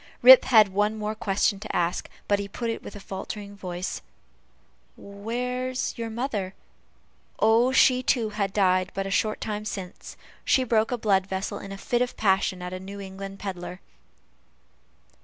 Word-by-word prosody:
Rip 255 +1 +10
had 215 -5 +6
but - - -16
one 210 +2 +1
more 215 0 -2
question 200 -1 0
to - - -6
ask; 175 0 -1 0.2
but 205 0 +2
he 200 - -4
put 230 +3 -3
it - - -5
with - - -10
a - - -8
faltering 200 +1 -7
voice: 180 -2 -5 1.0
"Where's 250 +5 -3
your 230 -2 -4
mother?" 220 -5 -3 0.8
Oh, 230 +3 +4
she 255 -1 +5
too 235 -3 +1
had 205 -2 -2
died 185 -2 +2
but 195 - -2
a 195 - -4
short 215 +2 0
time 210 -1 -4
since; 195 -3 -7 0.3
she 260 - +3
broke 225 -2 +1
a 245 - 0
blood 195 -4 +2
vessel 190 0 -3
in 195 - -9
a 195 - -6
fit 240 +4 -1
of 250 - -1
passion 190 -2 +1
at 180 0 -5
a 185 - -5
New 200 +2 -8
England 195 0 -8
pedler. 180 -2 -6
205 Hz, 175 wpm, -26 LUFS, 195-225 Hz, 1.0 s, Rip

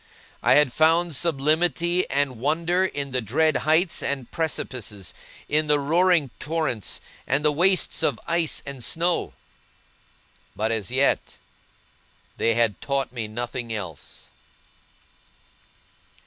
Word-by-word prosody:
I - - +4
had 145 -4 +4
found 165 +2 +3
sublimity 165 +4 +1
and 140 -4 0
wonder 165 +7 +1
in 140 -6 -4
the 130 0 0
dread 150 +7 +2
heights 160 +5 +1
and 135 -4 -2
precipices, 125 - -3 0.3
in 155 +1 +1
the 150 -1 +3
roaring 165 -1 +2
torrents, 150 - -2 0.3
and 140 +4 +1
the 150 - +5
wastes 180 +5 +2
of - - +1
ice 170 -2 0
and 140 -3 -7
snow; 170 +7 0 1.2
but 110 +2 -1
as 110 -4 -2
yet, 135 +3 +1 1.0
they 115 0 +2
had 115 -4 +1
taught 135 -2 -2
me 115 -3 -4
nothing 120 +1 -5
else. 95 -9 -7
145 Hz, 120 wpm, -24 LUFS, 120-165 Hz, 1.2 s, the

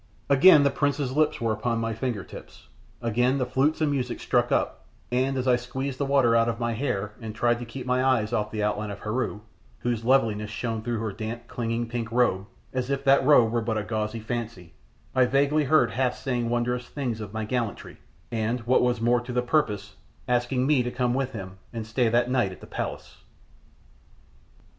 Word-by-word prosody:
Again 145 +2 +8
the 140 - +3
prince's 140 -2 -1
lips 155 0 +2
were 110 -2 -2
on 120 -1 +1
my 115 0 -1
fingertips; 110 -3 -6 0.3
again 125 +4 +2
the 130 - 0
flutes 135 +6 +1
and 150 -2 +2
music 135 -3 -2
struck - - +1
up; - - -1 0.2
and 130 +2 +1
as 130 0 -1
I 125 -1 +5
squeezed 130 +2 -5
the 140 - 0
water 135 -4 +4
out 115 0 +3
of 115 0 -3
my 120 -1 -1
hair, 110 -4 -2
and 110 -1 -6
tried 120 +1 +2
to 120 - -6
keep 125 +2 -7
my 125 0 +1
eyes 120 -4 +2
off 105 -2 0
the 105 -1 -3
outline 105 0 -1
of 100 - -7
Heru, 105 -1 -2 0.4
whose 120 -2 -1
loveliness 115 -5 +2
shone 110 +1 -3
through 120 +1 -2
her 110 -2 -2
damp, 115 +3 -6
clinging, 115 0 -2
pink 115 -1 -4
robe, 115 -5 +1 0.3
as 130 0 -2
if 140 0 -1
that 135 0 +5
robe 130 -5 +5
were 120 0 +1
but 110 -1 -1
a 105 - -1
gauzy 110 +1 -3
fancy, 110 -6 -5 0.4
I 130 -1 +4
vaguely 140 +3 +2
heard 155 +3 +4
Hath 130 -1 0
saying 120 -3 -2
wondrous 120 +1 -1
things 125 -6 -3
of 105 -2 -7
my 110 0 -3
gallantry, 115 -1 -3 0.3
and, 115 +2 -1
what 120 +2 +3
was 125 -2 +1
more 120 +1 +3
to 120 +1 -7
the 125 0 0
purpose, 105 -7 0 0.3
asking 125 +1 +1
me 145 -2 +3
to 120 - -2
come 125 0 0
with 135 0 -1
him 95 -3 -8
and 115 -2 -5
stay 115 +1 +1
that 120 +1 +2
night 125 -6 +1
at 90 - -11
the - - -11
palace. - - -6
120 Hz, 205 wpm, -26 LUFS, 110-130 Hz, 0.4 s, Again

